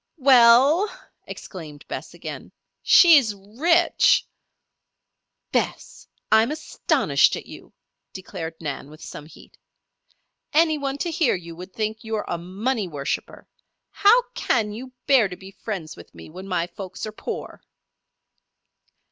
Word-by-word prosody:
"We 270 -2 +4
ell!" 260 - +6 0.4
exclaimed 155 -6 -10
Bess, - - -7
again. - - -8 0.3
"She's 285 - +6
rich." 275 - +2 1.3
"Bess! - - -3 0.2
I'm 220 +2 +5
astonished 305 +1 +1
at - - -8
you," - - -13 0.4
declared 180 -4 -7
Nan, 145 -3 -6
with 155 +1 -14
some 150 - -9
heat. - - -18 0.9
"Any 315 0 +3
one 275 -1 -3
to 340 +3 -2
hear 320 -5 +2
you 170 -2 -9
would 180 +3 -10
think 220 0 -3
you 220 -1 -3
a 175 -4 -4
money 200 +5 -2
worshipper. 145 -4 -5 0.4
How 455 +5 +5
can 215 -3 0
you 250 +5 -8
bear 265 -7 +5
to 180 - -8
be 190 0 -12
friends 190 -5 -6
with 85 - -15
me 80 - -12
when 185 +3 -9
my 180 -3 0
folks 190 +2 -8
are 215 - -6
poor." 215 - -7
215 Hz, 130 wpm, -23 LUFS, 180-275 Hz, 1.3 s, ell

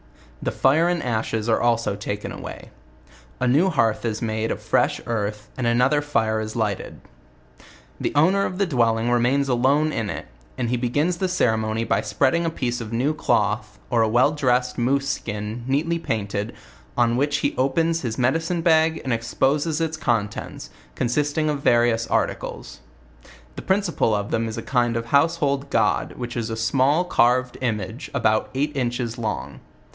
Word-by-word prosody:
The - - -1
fire 155 +6 +3
and 175 -2 -1
ashes 110 -2 -1
are 115 - +2
also 115 -3 +1
taken 100 0 -5
away. - - -9 0.7
A 125 - +1
new 150 +10 +4
hearth 115 -10 +1
is 110 -2 -2
made 110 0 -1
of - - -2
fresh - - +1
earthy 105 -2 -2
and 125 -2 -1
another 125 +5 +3
fire 110 -7 0
is 110 0 -5
lighted. 105 -4 -2 1.0
The - - -1
owner 185 +7 +4
of 180 - -6
the 200 - +2
dwelling 120 -6 +1
remains 125 +4 +2
alone 135 +5 +2
in 110 -7 -2
it; - - -5 0.3
and 120 - -1
he 125 - +1
be 120 0 -1
gins 160 +7 +1
the 190 - 0
ceremony 110 -10 0
by 100 -2 +1
spreading 130 +11 +1
a 165 - +1
piece 120 -6 -3
of 110 -1 -7
new 130 +7 +1
cloth, 105 -7 0
or 120 -2 +3
a 110 - +3
well 120 +6 +4
dressed 125 -4 0
moose 135 +3 +1
ski 115 -6 -3
a 105 - -4
neatly 135 +10 -1
painted, 105 -7 -3 0.4
on 120 -1 +3
which 145 +3 +1
he - - 0
opens 165 +5 +1
his 115 -3 -3
medicine 165 +7 0
bag 160 -1 +3
and 130 - -1
exposes 140 +7 0
its 160 -1 -1
contents, 110 -8 -2 0.2
consisting 145 +5 0
of, 150 -2 0
va 125 - +4
rious 120 -1 +1
articles. - - -2 0.8
The - - -6
principle 190 - +1
of 100 0 -3
them 115 0 0
is 110 - -5
a - - -4
kind 120 -3 +1
of 115 - -3
household 140 0 +1
god, 110 -5 +1
which 120 -1 -5
is 115 -1 -2
a 115 - -3
small 135 +9 +2
dftrved 125 -3 +2
image 115 +2 -3
about 110 -4 +1
eight 145 +2 -1
inches 120 -2 -2
long. 105 - -4
125 Hz, 175 wpm, -23 LUFS, 115-145 Hz, 1.0 s, new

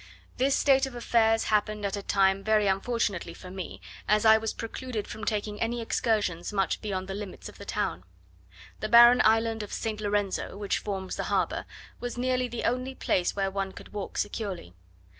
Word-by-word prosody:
This 270 +2 +3
state 270 -1 +4
of 260 - -9
affairs 225 -2 +3
happened 210 0 0
at 200 - -1
a 200 - -4
time 195 0 +2
very 215 -1 +3
unfortunately 195 -3 -1
for 180 - -10
me, 185 -2 -7 0.3
as 210 +1 +3
I 220 0 +9
was 220 0 0
precluded 225 -1 -5
from 220 0 -7
taking 210 -1 -2
any 235 +1 0
excursions 210 -7 0
much 195 -2 0
beyond 190 -3 -3
the 195 - -4
limits 200 -1 -7
of - - -13
the - - -8
town. 85 +2 -2 0.8
The 215 - -3
barren 240 +2 +8
island 225 0 +3
of 210 - -7
St. 215 -1 -3
Lorenzo, 205 -2 -1
which 205 -1 -1
forms 190 -2 -4
the - - -2
harbour, - - 0 0.3
was 245 0 -5
nearly 255 0 +1
the 240 -1 -5
only 255 +2 -1
place 180 -7 0
where 195 -1 0
one 195 -1 -3
could - - -12
walk 205 -2 -5
securely. 200 - -3
215 Hz, 185 wpm, -28 LUFS, 195-230 Hz, 0.8 s, I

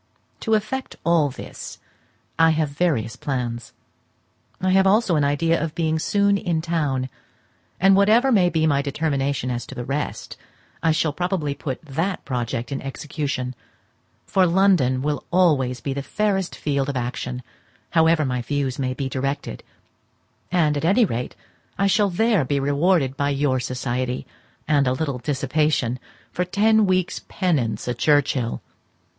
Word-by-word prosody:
To 220 -1 +1
effect 215 +5 -3
all 165 -3 +3
this 130 - -9 0.6
I 165 0 +6
have 155 -2 +1
various 140 -7 0
plans. 125 -3 -4 0.9
I 185 0 +1
have 190 +1 +4
also 200 -3 +3
an 150 - +2
idea 150 +3 +1
of 160 -2 -4
being 160 -1 0
soon 200 +3 +2
in 175 -5 -1
town; 150 -6 -1 0.7
and 195 +1 +5
whatever 220 +7 +4
may 185 -6 +4
be 160 -2 +1
my 140 -3 +2
determination 140 -3 -1
as 120 -1 -3
to 135 - -9
the 120 -2 -5
rest, 145 +3 -4 0.4
I 165 - +3
shall 155 -1 +1
probably 175 -4 -1
put 140 -1 -5
that 165 +7 -2
project 120 0 -3
in 140 - -3
execution; 135 -2 -4 0.7
for 185 -2 +3
London 170 -9 +3
will 150 0 0
be - - -28
always 145 -9 +2
the 140 0 -3
fairest 195 +3 -1
field 140 -2 -1
of 140 - -2
action, 125 0 -4 0.5
however 160 -2 +4
my 125 -1 -1
views 135 +1 -2
may 130 -1 -1
be 135 -1 -3
directed; 135 - -3 0.9
and 160 -5 +2
at 145 - -3
any 200 +8 +4
rate 125 - -4 0.4
I 200 - +2
shall 200 +1 +3
there 215 -1 +2
be 140 +2 0
rewarded 145 0 +2
by 140 +1 0
your 140 -2 +1
society, 125 0 -3 0.4
and 145 -3 +3
a 125 - +2
little 140 -2 -2
dissipation, 135 -1 0 0.3
for - - -3
a - - +1
ten 215 +2 +3
weeks' 185 -1 0
penance 130 - -1
at 120 -1 -3
Churchhill. 145 -5 +1
150 Hz, 155 wpm, -23 LUFS, 130-180 Hz, 0.9 s, I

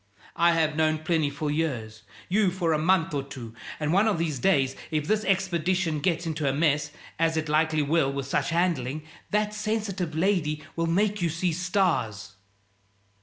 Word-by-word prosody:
I 170 0 +4
have 160 -2 +1
known 155 0 +2
Plinny 160 -3 +1
for 145 +1 -3
years 120 -9 -2 0.3
you 200 +1 +3
for 175 -3 0
a 155 - +1
month 165 0 +2
or 140 - 0
two; 130 -5 -9 0.3
and 150 +1 0
one 200 +4 +4
of 210 - +1
these 160 -5 -1
days, 135 -3 +2
if 155 -2 -1
this 215 +3 +1
expedition 185 -3 0
gets 170 +1 0
into 155 -3 -1
a - - 0
mess 145 0 +1 0.3
as 165 -1 +2
it 155 0 -1
likely 155 0 +2
will 145 -1 +2
with 140 -1 -3
such 135 - 0
handling 155 -5 0 0.3
that 210 0 0
sensitive 210 -6 -2
lady 160 -4 +1
will 165 0 0
make 205 +4 +1
you 170 - +2
see 170 +2 -1
stars." 175 - 0
160 Hz, 175 wpm, -26 LUFS, 150-185 Hz, 0.3 s, I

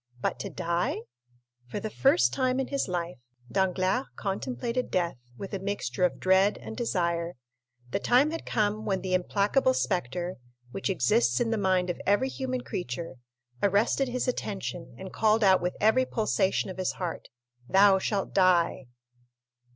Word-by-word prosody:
But - - -2
to - - -4
die? 170 +1 -1 0.7
For 165 - -4
the 215 +1 -5
first 275 - +3
time 255 -1 +1
in 265 - -2
his 275 - -1
life, 175 -5 -3 0.3
Danglars 190 +5 +1
contemplated 195 - -3
death 175 -6 0 0.2
with 195 +1 -7
a 195 - -2
mixture 190 -8 -3
of 180 - -1
dread 190 +2 +3
and 220 - -8
desire; 170 -7 -1 0.6
the - - 0
time 255 +8 +3
had 330 - -4
come 215 0 0
when 195 -3 -1
the 185 0 -3
implacable 205 +8 +2
spectre, 180 - -2 0.3
which 195 - -3
exists 125 -7 +2
in 230 - 0
the - - +2
mind 185 -2 +2
of - - -8
every 205 +7 +3
human 255 -1 -3
creature, 170 - -5 0.4
arrested 205 +7 +2
his 250 +1 -2
attention 195 -7 -4
and 190 0 -9
called 220 0 +3
out 190 -2 +5
with 180 +1 -2
every 220 +5 +3
pulsation 195 -3 0
of 185 - -10
his 185 - 0
heart, 175 -3 -5 0.4
"Thou 195 0 +6
shalt 195 0 -2
die!" 175 -7 +3
195 Hz, 160 wpm, -28 LUFS, 180-220 Hz, 0.7 s, Thou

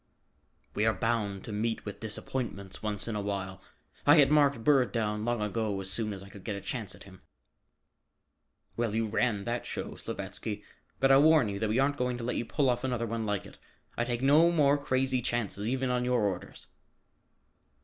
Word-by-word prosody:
"We 105 +2 +1
are 110 - +2
bound 105 -4 -1
to - - -7
meet 110 +2 -2
with 105 - -6
disappointments 105 -3 -4
once 105 -1 -2
in 115 - -2
a 105 - -1
while. 95 -2 -4 0.4
I 145 - +7
had 145 -3 +6
marked 140 -6 +4
Bird 130 -5 +4
down 105 -1 -1
long 120 -2 0
ago 105 -1 -1
as 95 0 -2
soon 110 +1 0
as 95 -1 -6
I 100 - -12
could 100 -1 -12
get 105 - -3
a - - -4
chance 110 -2 -5
at - - -13
him." 95 -1 -15 1.5
"Well, 115 -2 -1
you 115 0 +1
ran 105 -1 0
that 120 +3 -3
show, - - -5
Slavatsky, 105 -1 -5 0.4
but 135 0 +4
I'll 135 +1 +7
warn 155 -7 +5
you 100 0 -4
that 110 0 0
we 110 - +1
aren't 140 +2 +2
going 125 -1 -1
to 120 - -6
let 125 +1 -2
you 120 - -1
pull 140 +3 +1
off 120 0 +1
another 125 -3 -1
one 115 -1 -3
like 105 -2 -1
it. - - -14 0.4
I 120 - 0
take 120 +1 -2
no 150 +5 +6
more 145 -4 +4
crazy 130 -2 0
chances, 115 -3 -1
even 130 0 0
on 125 0 +1
your 125 -1 +2
orders." 95 -3 -3
115 Hz, 205 wpm, -30 LUFS, 105-130 Hz, 1.5 s, I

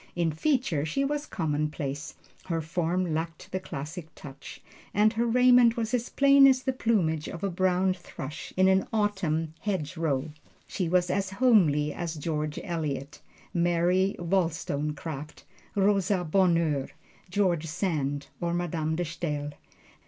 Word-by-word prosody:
In 170 -2 +1
feature 190 - 0
she 220 - 0
was 295 +1 -2
commonplace, 150 -3 -3 0.3
her 165 -3 -1
form 170 +2 -1
lacked 160 0 -4
the 185 - -1
classic 160 0 -7
touch, 140 -2 -10 0.4
and 215 +2 +4
her 235 +1 0
raiment 245 -1 +5
was 230 +1 -2
as 240 -1 0
plain 275 0 +6
as 260 -1 +3
the 265 - 0
plumage 175 -11 0
of 170 - -7
a 200 - 0
brown 185 +1 +2
thrush 155 -5 -8
in 185 0 +5
an 190 0 +3
autumn 185 -8 0
hedgerow. 160 -6 -2 0.3
She 180 -4 -2
was 180 0 +2
as 195 -1 0
homely 185 - +3
as 170 -2 -4
George 150 -1 -3
Eliot, 150 -4 -4 0.3
Mary 175 +2 +2
Wollstonecraft, 155 -4 -2 0.3
Rosa 195 -2 +2
Bonheur, 165 -5 +2 0.4
George 175 -4 +1
Sand, 150 -5 -2
or 170 -1 -1
Madame 160 -2 -1
De 175 +1 -1
Stael. 150 -3 -3
175 Hz, 135 wpm, -28 LUFS, 155-195 Hz, 0.4 s, plain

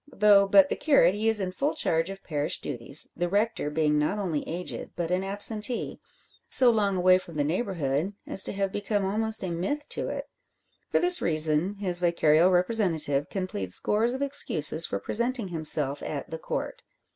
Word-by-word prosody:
Though 200 -1 +4
but 285 +8 +5
the - - -1
curate, 275 - +3
he 215 +2 0
is 225 -1 +3
in 185 -2 -3
full 275 +11 -2
charge 165 - 0
of 195 0 -9
parish 150 -2 -2
duties, 120 +5 0
the 175 +1 -2
rector 205 -4 -1
being 150 -1 0
not 150 +8 -1
only 175 -8 -2
aged 175 +2 -6
but 170 -1 -4
an 185 +1 0
absentee 210 +4 -2 0.5
so 250 -2 +7
long 200 -4 0
away 185 0 +4
from 170 -3 -12
the 145 - 0
neighbourhood 165 - -2
as 195 - +4
to - - -3
have 195 -1 -2
become 205 0 -2
almost 220 +2 0
a 185 - -3
myth 290 - -3
to - - -2
it. - - -5 0.6
For - - +1
this 355 0 +2
reason 155 +4 0
his 185 -3 -2
vicarial 170 -1 +3
representative 175 -7 0
can 190 -2 -3
plead 95 - -5
scores 225 - +1
of 270 - -3
excuses 165 - +2
for - - -3
presenting 235 - -2
himself 150 -4 0
at 145 -3 -6
"The 160 - -6
Court." - - -5
185 Hz, 185 wpm, -26 LUFS, 160-210 Hz, 0.6 s, so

